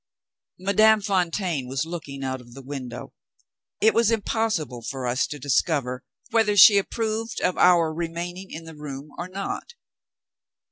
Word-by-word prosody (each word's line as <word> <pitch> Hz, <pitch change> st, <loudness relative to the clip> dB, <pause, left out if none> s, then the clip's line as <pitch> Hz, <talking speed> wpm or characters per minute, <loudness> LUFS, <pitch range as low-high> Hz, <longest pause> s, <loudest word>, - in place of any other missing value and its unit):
Madame 215 Hz, +3 st, +4 dB
Fontaine 180 Hz, -7 st, -1 dB
was 135 Hz, +4 st, -2 dB
looking 150 Hz, -5 st, -7 dB
out 130 Hz, -1 st, -3 dB
of 120 Hz, 0 st, -16 dB
the 135 Hz, -, -10 dB
window. 130 Hz, -3 st, -7 dB, 0.7 s
It 220 Hz, -, +4 dB
was 230 Hz, -2 st, +3 dB
impossible 215 Hz, -, -1 dB
for 130 Hz, +2 st, -5 dB
us 125 Hz, +2 st, +1 dB
to 150 Hz, -, -6 dB
discover 135 Hz, -1 st, 0 dB, 0.3 s
whether 215 Hz, -3 st, +2 dB
she 200 Hz, +1 st, +9 dB
approved 225 Hz, +2 st, -3 dB
of 180 Hz, -, +1 dB
our 170 Hz, -3 st, +4 dB
remaining 175 Hz, +3 st, -5 dB
in 165 Hz, -, -8 dB
the 165 Hz, 0 st, -10 dB
room 145 Hz, -1 st, -8 dB
or 175 Hz, -, -4 dB
not. 195 Hz, -, -5 dB
170 Hz, 145 wpm, -24 LUFS, 135-200 Hz, 0.7 s, she